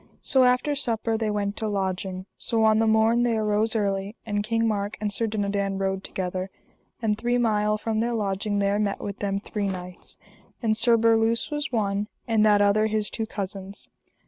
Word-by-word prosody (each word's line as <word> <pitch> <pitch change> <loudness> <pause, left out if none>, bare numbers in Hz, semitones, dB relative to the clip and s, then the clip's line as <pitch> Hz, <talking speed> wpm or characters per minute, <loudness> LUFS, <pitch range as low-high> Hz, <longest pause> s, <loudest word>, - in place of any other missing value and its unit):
So 265 -2 +4
after 250 +4 +2
supper 230 -5 -1
they 220 -1 -1
went 205 -1 -1
to 220 - -1
lodging. 190 -2 -2
So 225 -1 0
on 220 0 +5
the 225 - +3
morn 220 +2 +4
they 235 -2 +2
arose 215 +1 +1
early, 200 0 -1
and 205 -2 -1
King 225 +1 +1
Mark 205 -1 -2
and 210 -1 -2
Sir 225 +3 0
Dinadan 200 -2 -1
rode 190 0 -1
together; 185 0 -4 0.5
and 215 -1 +2
three 240 +3 0
mile 215 -3 +2
from 220 0 -2
their 235 +1 0
lodging 205 -1 -1
there 200 +1 +1
met 205 -2 -1
with 200 0 -6
them 195 -1 -1
three 205 0 -3
knights, 180 -1 -7 0.4
and 220 -2 +1
Sir 230 +1 +4
Berluse 225 +3 +2
was 295 -2 -2
one, 205 -3 0 0.2
and 225 -2 +3
that 205 -1 +5
other 210 +2 +3
his 215 -1 -1
two 225 -1 -3
cousins. 195 -1 -7
210 Hz, 190 wpm, -25 LUFS, 200-225 Hz, 0.5 s, on